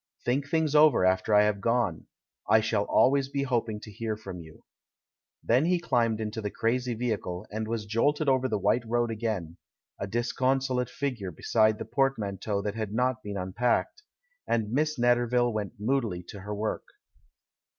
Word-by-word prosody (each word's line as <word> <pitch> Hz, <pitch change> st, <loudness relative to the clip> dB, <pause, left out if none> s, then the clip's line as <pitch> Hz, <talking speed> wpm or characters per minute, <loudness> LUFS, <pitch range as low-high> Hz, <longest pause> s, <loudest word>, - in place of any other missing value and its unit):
Think 135 Hz, +3 st, 0 dB
things 160 Hz, -1 st, +1 dB
over 150 Hz, -9 st, +6 dB
after 95 Hz, +3 st, +2 dB
I 105 Hz, -, +7 dB
have 105 Hz, -1 st, 0 dB
gone 115 Hz, -6 st, 0 dB, 0.2 s
— -, -, -23 dB
I 110 Hz, -, +6 dB
shall 110 Hz, -2 st, 0 dB
always 135 Hz, 0 st, +3 dB
be 140 Hz, 0 st, -1 dB
hoping 115 Hz, -5 st, -1 dB
to 105 Hz, -, -10 dB
hear 110 Hz, +1 st, -4 dB
from 95 Hz, -4 st, -8 dB
you." 80 Hz, -2 st, -14 dB, 0.8 s
Then 125 Hz, +6 st, +3 dB
he 180 Hz, +1 st, +2 dB
climbed 115 Hz, -9 st, +1 dB
into 110 Hz, 0 st, -4 dB
the 105 Hz, -, -2 dB
crazy 120 Hz, +3 st, -1 dB
vehicle, 105 Hz, -5 st, -3 dB
and 110 Hz, +1 st, -3 dB
was 110 Hz, -1 st, -3 dB
jolted 145 Hz, +8 st, +1 dB
over 130 Hz, -1 st, +3 dB
the 110 Hz, -4 st, -1 dB
white 115 Hz, +5 st, +2 dB
road 120 Hz, 0 st, +1 dB
again 105 Hz, -7 st, -3 dB, 0.2 s
— -, -, -46 dB
a 100 Hz, -, -2 dB
disconsolate 125 Hz, +2 st, 0 dB
figure 125 Hz, -9 st, -3 dB
beside 110 Hz, +5 st, +2 dB
the -, -, -6 dB
portmanteau 105 Hz, -7 st, -1 dB
that 105 Hz, -1 st, -2 dB
had 110 Hz, -2 st, -4 dB
not 125 Hz, 0 st, +1 dB
been 100 Hz, -1 st, -5 dB
unpacked 115 Hz, -, -1 dB, 0.2 s
— -, -, -45 dB
and 110 Hz, -2 st, 0 dB
Miss 155 Hz, +3 st, 0 dB
Netter 120 Hz, 0 st, +3 dB
ville 120 Hz, -1 st, +2 dB
went 105 Hz, -2 st, -3 dB
moodily 110 Hz, -5 st, -1 dB
to 100 Hz, -, -8 dB
her 105 Hz, +2 st, -5 dB
work. 105 Hz, +1 st, -3 dB
115 Hz, 180 wpm, -28 LUFS, 105-130 Hz, 0.8 s, I